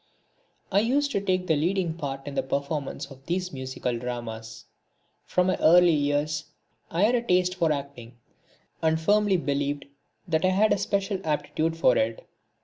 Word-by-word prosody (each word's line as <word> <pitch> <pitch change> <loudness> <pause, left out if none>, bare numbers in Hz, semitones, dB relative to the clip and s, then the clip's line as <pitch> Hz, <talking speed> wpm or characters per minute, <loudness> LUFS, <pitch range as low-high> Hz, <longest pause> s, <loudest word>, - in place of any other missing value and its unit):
I 195 - +4
used 280 +6 +1
to 200 - 0
take 185 -2 0
the 160 -3 +2
leading 170 +2 0
part 135 -4 -5
in 145 - -6
the - - 0
performance 140 +2 -3
of 135 0 -13
these 180 0 -2
musical 130 -2 -3
dramas. 115 -2 -6 0.6
From 180 - +2
my 185 - +1
early 175 +1 +6
years 150 +1 0 0.4
I 170 +4 0
had 225 +4 +4
a 245 - +2
taste 180 -5 +2
for 170 -4 +1
acting, 140 -5 -5 0.6
and 160 0 +2
firmly 205 +3 +3
believed 145 -2 -2 0.4
that 160 0 +1
I 185 - +4
had 200 +4 +3
a - - -1
special 195 0 -1
aptitude 155 +1 -1
for 130 -6 +4
it. 110 +1 -2
160 Hz, 165 wpm, -26 LUFS, 140-185 Hz, 0.6 s, early